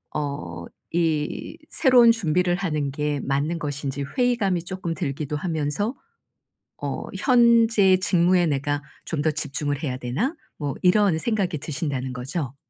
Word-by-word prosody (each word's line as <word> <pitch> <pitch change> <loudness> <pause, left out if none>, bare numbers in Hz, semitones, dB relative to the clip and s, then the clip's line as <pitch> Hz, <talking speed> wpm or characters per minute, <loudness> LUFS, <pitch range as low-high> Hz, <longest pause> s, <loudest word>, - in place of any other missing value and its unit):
어 85 - -4 0.3
이 160 -3 -1
새로운 250 -5 +6
준비를 180 -4 +1
하는 155 -6 -1
게 150 +1 -1
맞는 145 +5 -1
것인지 140 -2 -3
회의감이 225 -9 +1
쪼끔 185 -2 -3
들기도 150 -2 -3
하면서 160 - -1 0.9
어 - - -3
'현재 230 -6 +5
직무에 180 -1 +3
내가 145 0 -1 0.2
좀 155 -3 -2
더 155 - +2
집중을 145 -1 -3
해야 130 -4 -2
되나?' 150 - -2 0.2
뭐 145 -3 -3
이런 185 -2 +4
생각이 190 -6 -1
드신다는 135 -3 -3
거죠. 135 +2 -4
160 Hz, 270 characters per minute, -24 LUFS, 145-190 Hz, 0.9 s, 새로운